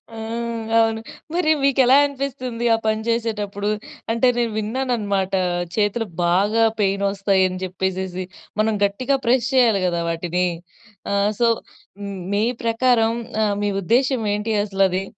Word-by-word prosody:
ఆ! - - -8 0.6
అవును. 225 0 +2 0.3
మరి 330 -3 +2
మీకెలా 270 -1 +5
అనిపిస్తుంది 255 -4 -4
ఆ - - -1
పని 220 0 +1
జేసేటప్పుడు? 210 -3 -1 0.4
అంటే 230 +2 +2
నేను 235 -2 0
విన్నానన్నమాట 210 -4 -1 0.5
చేతులు 215 +2 +1 0.2
బాగా 205 +6 +3 0.2
పెయినొస్తాయని 195 -1 +1
చెప్పేసెసి, 185 0 -3 0.4
మనం 220 0 +1
గట్టిగా 255 +7 0
ప్రెస్ 245 +1 +2
జేయాలి 230 -7 +4
గదా 170 -1 -1
వాటిని. 175 +2 -1 0.6
ఆ! - - 0 0.3
సో, 240 - +4 0.5
హ్మ్, 200 -1 -5 0.2
మీ 210 - +2 0.2
ప్రకారం 230 -1 +2 0.3
ఆహ్, 205 -1 +1
మీ 205 - +1
ఉద్దేశ్యం 245 +3 +1
ఏంటి 215 +2 -2
అసలది? 195 -2 +1
215 Hz, 125 wpm, -21 LUFS, 195-240 Hz, 0.6 s, మీకెలా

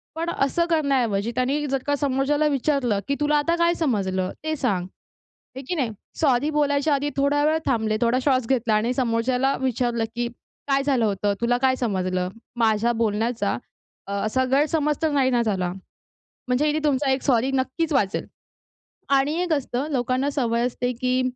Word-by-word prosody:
पण 330 +1 -2
असं 340 +2 +1
करण्याऐवजी 250 -9 +1
त्यांनी 275 +4 0
जर 270 0 0
का 290 - +2
समोरच्याला 285 +2 +1
विचारलं 255 -6 0
की 280 - 0
"तुला 295 0 +2
आता 335 +3 +1
काय 340 0 +3
समजलं 195 - -1
ते 315 0 -1
सांग." 200 -11 -1 0.7
आहे 265 - -6
की 355 - -1
नाही? 265 -8 0 0.3
सॉरी 280 -2 +2
बोलायच्या 290 0 +1
आधी 285 +1 -1
थोडा 285 +1 +2
वेळ 310 +1 +3
थांबले, 220 -4 +1
थोडा 240 +2 +2
श्वास 260 -4 +2
घेतला 240 -3 +1
आणि 220 +4 +1
समोरच्याला 250 +2 +1
विचारलं 240 -2 0
की 240 0 -1 0.4
"काय 275 0 +2
झालं 265 -5 +2
होतं? 205 0 0
तुला 240 +1 +2
काय 260 +1 +2
समजलं? 185 -6 -1 0.3
माझ्या 225 0 +2
बोलण्याचा 220 - 0 0.5
अ, - - -6
असा 260 +4 +1
गैरसमज 300 +2 +2
तर 320 -1 +1
नाही 275 -3 +2
ना 240 - +2
झाला." 190 -5 -1 0.8
म्हणजे 255 +4 +2
हे 300 - 0
तुमचा 280 -1 +2
1 265 0 0
सॉरी 255 -1 +2
नक्कीच 270 +5 -1
वाचेल. 205 -9 0 0.8
आणि 275 +2 +3
एक 355 -2 0
असतं 275 -1 -2
लोकांना 255 +1 0
सवय 235 -4 0
असते 245 0 -2
की 255 0 +2
260 Hz, 170 wpm, -23 LUFS, 230-290 Hz, 0.8 s, काय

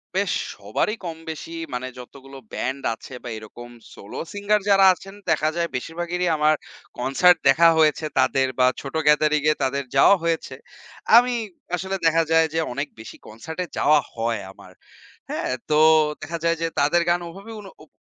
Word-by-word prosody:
বেশ - - +1 0.2
সবারই 215 - -2
কম 165 -1 -5
বেশি, 165 +1 -8 0.2
মানে 125 +1 -3
যতগুলো 135 +2 -12 0.2
ব্যান্ড 135 +2 -3
আছে, 130 - -12
বা - - -6
এরকম 120 +3 -11 0.2
solo 100 - -9
singer 205 +1 +1
যারা 195 -1 +6
আছেন, 195 +2 -12 0.2
দেখা 155 - +2
যায় 170 0 0
বেশিরভাগেরই 175 +6 -3
আমার 155 +1 +3 0.4
কনসার্ট 175 +8 +4
দেখা 170 +1 +6
হয়েছে 155 0 +3
তাদের, 130 0 +2
বা 125 - +5
ছোট 140 +3 -8
gathering-এ 150 0 +3
তাদের 140 +1 -1
যাওয়া 170 +8 +6
হয়েছে। 165 -5 -2 0.6
আমি 245 +1 +4 0.4
আসলে 190 +2 -4
দেখা 165 0 +4
যায় 160 0 +4
যে 165 - 0
অনেক 140 +3 -3
বেশি 110 - -10
কনসার্টে 160 +11 -6
যাওয়া 150 0 +4
হয় 115 -2 -2
আমার। - - -16 0.6
হ্যাঁ? - - -3 0.2
তো 150 - +3 0.4
দেখা 170 0 -5
যায় 165 0 +1
যে 165 - +1
তাদের 150 +5 +3
গান 175 0 +2
ওভাবে 195 +6 -11
উন 200 - -12 0.2
উপ - - -35
155 Hz, 165 wpm, -23 LUFS, 135-175 Hz, 0.6 s, যারা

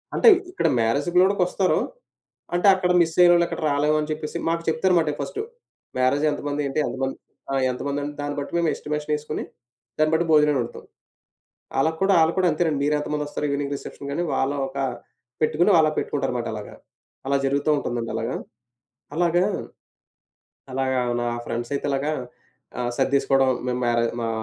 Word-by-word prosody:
అంటే 460 - +7 0.2
ఇక్కడ 170 - 0
మ్యారేజ్ 115 +8 +1
గూడా 190 +2 +5
కొస్తారు. 180 +1 +2 0.8
అంటే 175 +3 +3
అక్కడ 180 -1 0
మిసయినోళ్ళు 170 +1 +5
అక్కడ - - -5
రాలేమని 150 +1 +1
చెప్పేసి 155 0 -4
మాకు 165 0 -1
చెప్తారు 180 +4 +2
మాట 160 -2 +1
ఫస్టు. 420 - -4 0.6
మ్యారేజ్ 130 +4 +2
ఎంతమంది 145 0 -3
ఏంటి 135 - -2
ఎంతమంది 135 0 -3 0.4
ఆ! - - +1 0.2
ఎంత 125 - -6
మంది 140 0 -2 0.2
దాన్ని 145 0 -3
బట్టి 140 - -5
మేమెస్టిమేషన్ 150 -2 -1
ఏసుకొని 150 0 -4 0.5
దాన్ని 155 0 +2
బట్టి 165 +2 +2
భోజనాలు 150 -2 +5
వండుతాం. 120 - -7 1.0
ఆళ్ళకి 160 +3 +1
కూడా 195 +1 +4
అళ్ళు 160 +1 +1
కూడా 185 -1 +3
అంతేనండి. 155 -2 0
మీరెంత 150 0 0
మందొస్తారు 150 0 -3
ఈవినింగ్ 140 0 -2
రిసెప్షన్ 140 0 -8
కని 170 +5 -1
వాళ్ళు 135 +2 0
ఒక 135 +1 -9 0.6
పెట్టుకొని 155 +5 +3
ఆళ్ళు 155 -1 +4
పెట్టుకుంటారు 140 -3 -1
మాట 120 - -3
అలాగా. 105 -1 -8 0.5
అలా 140 0 +2
జరుగుతూ 140 +2 0
ఉంటుందండి 120 -4 -3
అలాగ. 115 - -2 0.8
అలాగా, 175 +2 +2 1.3
అలాగా 130 0 0 0.2
నా - - -1 0.2
ఫ్రెండ్సయితే 120 +4 -3
అలాగా 140 +3 0 0.7
ఆహ్, 120 0 -1
సర్డేసుకోవడం 135 -1 +2 0.2
మేము 125 0 -1
మ్యారే 120 -1 +2 0.2
మా 115 - -1
150 Hz, 150 wpm, -24 LUFS, 135-160 Hz, 1.3 s, అంటే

